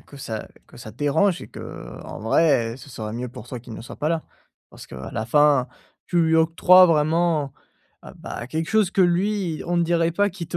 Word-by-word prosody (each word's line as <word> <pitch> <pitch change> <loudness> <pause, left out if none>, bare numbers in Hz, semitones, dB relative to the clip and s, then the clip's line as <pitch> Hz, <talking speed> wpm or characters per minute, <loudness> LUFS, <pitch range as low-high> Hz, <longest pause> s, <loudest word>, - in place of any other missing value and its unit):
que 140 - -15
ça 110 -5 -6 0.2
que - - -16
ça - - -10
dérange 170 +6 +1
et - - -10
qu'en - - -9
vrai 115 -1 +2
ce 135 - -13
serait 110 -4 -6
mieux 125 +2 -4
pour 120 - -11
toi 125 -2 -7
qu'il 115 -2 -10
ne - - -8
soit - - -10
pas 150 - -1
là. 165 -1 -1 0.5
Parce - - -12
qu'à 65 +1 -9
la 110 -1 -3
fin 145 -1 +3 0.4
tu 175 - 0
lui 160 0 +2
octroies 180 +3 +6
vraiment 155 -2 +1 0.5
ah - - -12
bah, 120 - -7
quelque 160 +4 -3
chose 215 -4 +3
que 195 - 0
lui, 180 -1 0
on 175 0 0
ne 170 - +3
dirait 170 0 +1
pas 205 +3 +2
qu'il 175 -3 -7
te 175 - -3
160 Hz, 215 wpm, -23 LUFS, 125-175 Hz, 0.5 s, octroies